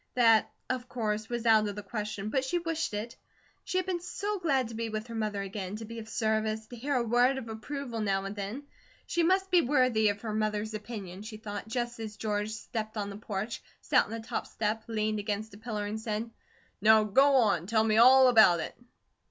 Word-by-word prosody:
That, 225 -3 +5 0.2
of 255 0 -3
course, 215 -2 -2
was 240 -1 -3
out 220 -2 +5
of 205 - -4
the 210 - -6
question, 210 0 -4
but 265 -2 +1
she 270 +7 0
wished 330 -8 -2
it. 220 +3 -5 0.5
She 370 - -2
had 370 - +1
been 370 -2 -1
so 405 +3 -3
glad 270 -8 +1
to - - -8
be 225 0 -3
with 215 0 -4
her 235 - -9
mother 210 -3 -2
again, 195 0 -5
to 225 +1 -6
be 230 +1 -7
of 220 0 -9
service, 220 -1 0
to 245 - -10
hear 275 +4 -2
a 245 - +2
word 245 +3 +3
of 250 -3 -6
approval 235 +2 -5
now 195 -2 0
and 195 +1 -5
then. 205 +7 -5 0.4
She 345 - 0
must 380 +3 +2
be 355 -1 +6
worthy 250 -6 +3
of 205 0 -3
her 220 -2 -4
mother's 215 0 -1
opinion, 205 -4 -7
she 215 0 -8
thought, 205 -1 -6
just 240 +1 -3
as 215 -2 -6
George 210 -1 -1
stepped 220 0 -5
on 205 -1 -3
the 200 - -7
porch, 210 +1 -4 0.2
sat - - +3
on - - -13
the 230 - -4
top 220 - -4
step, 220 +1 -2
leaned 215 -1 -1
against 205 +1 -3
a - - -11
pillar, 215 -2 -3
and 215 +1 -4
said: 220 +1 -3 0.5
"Now 220 +1 +6
go 270 +7 +4
on, 205 -9 +3
tell 220 0 +3
me 220 -1 +2
all 260 +3 +8
about 220 -8 +6
it." - - -5
220 Hz, 225 wpm, -30 LUFS, 210-245 Hz, 0.5 s, all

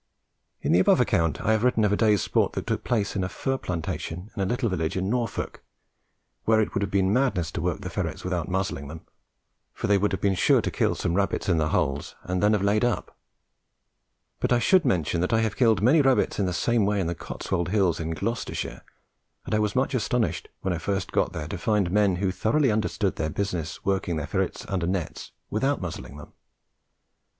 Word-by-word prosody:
In - - +1
the 90 - +5
above 95 - +4
account 85 - +1
I 110 0 +1
have 110 0 +2
written 125 -4 +3
of 105 - +2
a - - +4
day's 105 -2 +3
sport - - +1
that - - -4
took - - -2
place 105 -4 0
in 95 - 0
a 95 - -2
fir 135 +5 -2
plantation 90 +2 -4
in 100 - -2
a 95 - +1
little 120 +2 0
village 85 -4 -1
in 95 +2 -1
Norfolk, 120 -3 -2 0.8
where 110 0 +4
it 110 - 0
would 100 - 0
have 100 - -1
been 95 0 +2
madness 105 - +1
to - - -4
work - - -1
the - - -5
ferrets - - -3
without 90 -3 -2
muzzling 95 -6 -2
them, 80 +2 -8 0.7
for - - -3
they 100 0 +3
would 105 +2 +1
have 95 - -2
been 100 +1 +2
sure 90 - +4
to - - -2
kill - - +1
some 85 - -1
rabbits 100 +2 0
in 85 -3 +3
the 80 0 +1
holes 70 -5 -1
and 90 0 -2
then 105 +1 +4
have 105 -2 +1
laid 105 +2 +2
up; 120 -2 -1 1.2
but - - -1
I 120 - +5
should 170 - +4
mention 85 - +1
that 90 - 0
I 115 - +4
have 110 -2 -1
killed 110 -5 +3
many 145 +7 +6
rabbits 135 -5 +2
in 100 - +1
the - - -1
same 115 +5 +1
way 105 0 +1
on 95 - 0
the 85 - -1
Cotswold 85 +1 -3
Hills 95 -5 +2
in 80 -1 -3
Gloucestershire, 115 +10 -3 0.6
and - - -4
I 105 - +3
was 105 -1 0
much 130 +2 +1
astonished 125 -1 0
when 95 - -1
I 85 - -3
first 95 +2 -2
got - - +1
there 75 - -5
to - - -5
find 105 -7 +1
men 100 -2 +3
who 95 +1 0
thoroughly 125 +7 +2
understood 105 -2 -1
their 80 - -1
business 90 -2 -3
working 95 -3 0
their 75 -2 -2
ferrets - - -2
under 90 -3 -1
nets 90 -3 -3 0.2
without 135 +7 +1
muzzling 85 -5 -6
them. 75 - -12
100 Hz, 220 wpm, -26 LUFS, 90-110 Hz, 1.2 s, many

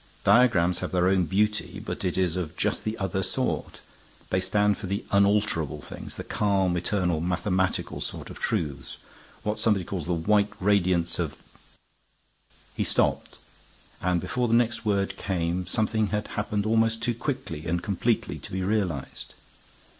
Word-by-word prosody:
Diagrams 90 -8 +4
have - - -4
their 90 0 +2
own 95 -1 +3
beauty; 105 +6 0
but - - -5
it 90 - -1
is 90 -3 +1
of 90 -4 -4
just - - 0
the 110 +1 -2
other 95 -1 -1
sort. - - -2 0.5
They 95 - +3
stand 105 +2 +2
for 100 - -5
the 100 +2 -2
unalterable 100 -7 +2
things; - - -8
the - - -5
calm, 95 -3 +1
eternal, 90 -2 0
mathematical 90 +1 0
sort - - -5
of - - -10
truths; 70 -4 -2 0.5
what 105 0 -1
somebody 100 -5 +2
calls 90 -5 -4
the 90 - +1
'white 100 +5 +3
radiance 90 -3 +2
of' - - -2 0.8
" - - -31
He - - 0
stopped, - - 0 0.6
and 90 -1 +1
before 125 +8 -1
the 115 - +3
next 120 -1 +1
word 100 -2 0
came 90 -2 -1
something 110 +2 +1
had 105 +1 -2
happened 105 -1 -2
almost 115 +1 +2
too 120 - +1
quickly 95 - -4
and 85 +2 -1
completely 110 +4 0
to - - -8
be 95 0 -2
realized. 95 -9 -2
95 Hz, 160 wpm, -27 LUFS, 90-105 Hz, 0.8 s, Diagrams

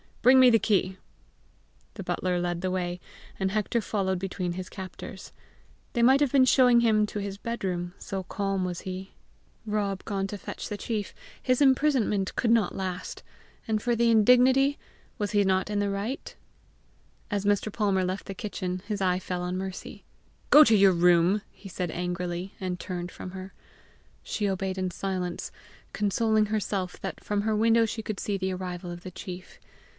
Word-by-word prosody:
Bring 260 +2 +7
me 255 -1 +8
the 225 - +5
key." 190 -3 +1 1.0
The 200 - -6
butler 180 0 -1
led 175 -1 -2
the 185 - -1
way, 180 -1 -2 0.4
and 190 -1 0
Hector 215 +3 0
followed 190 -3 -1
between 185 -2 -3
his 185 +1 -6
captors. 190 0 -9 0.6
They 235 - +1
might 260 +3 +6
have 285 -4 +2
been 270 -2 +5
showing 250 -2 +5
him 215 -2 +3
to 210 - -5
his 200 -1 -4
bed 235 +2 -5
room, 175 -2 -2
so 195 -1 -4
calm 195 0 -2
was 180 -1 -4
he: 190 +1 -7 0.5
Rob 205 -3 -1
gone 195 -2 -1
to 205 - -6
fetch - - -7
the 210 - -4
chief, 210 -2 -3 0.3
his 255 +2 +1
imprisonment 260 -8 +2
could 235 - +1
not 230 -2 +2
last! 185 -1 -5 0.4
and 215 -1 0
for 240 +1 +1
the 235 0 +3
indignity, 250 +5 +5 0.4
was 205 -1 -1
he 205 -1 +3
not 190 0 +1
in 205 -1 0
the 205 0 0
right! 205 +7 -4 0.9
As 205 -1 -2
Mr. 205 +1 +1
Palmer 200 -3 +1
left 185 +2 -3
the 195 - -6
kitchen, 185 -3 -4
his 210 -2 -3
eye 180 -1 +2
fell 180 -1 -4
on 180 +1 -2
Mercy. 190 0 -6 0.5
"Go 300 - +10
to 225 -6 +4
your 195 -2 +6
room," 175 +3 +4
he 195 - -12
said 180 -2 -3
angrily, 180 +1 -3
and 180 -2 -3
turned 180 -1 -5
from 185 - -8
her. 190 0 -8 0.7
She 205 -2 -1
obeyed 190 0 -2
in 185 0 -1
silence, 180 -1 -3 0.4
consoling 215 +1 +2
herself 200 -3 -2
that 190 - -6
from 205 -1 0
her 215 +1 0
window 225 +1 +4
she 220 0 -4
could 215 -3 -4
see 205 -1 -1
the 190 0 -2
arrival 180 -1 -5
of 175 0 -8
the 185 - -8
chief. 180 0 -9
195 Hz, 180 wpm, -27 LUFS, 185-215 Hz, 1.0 s, Go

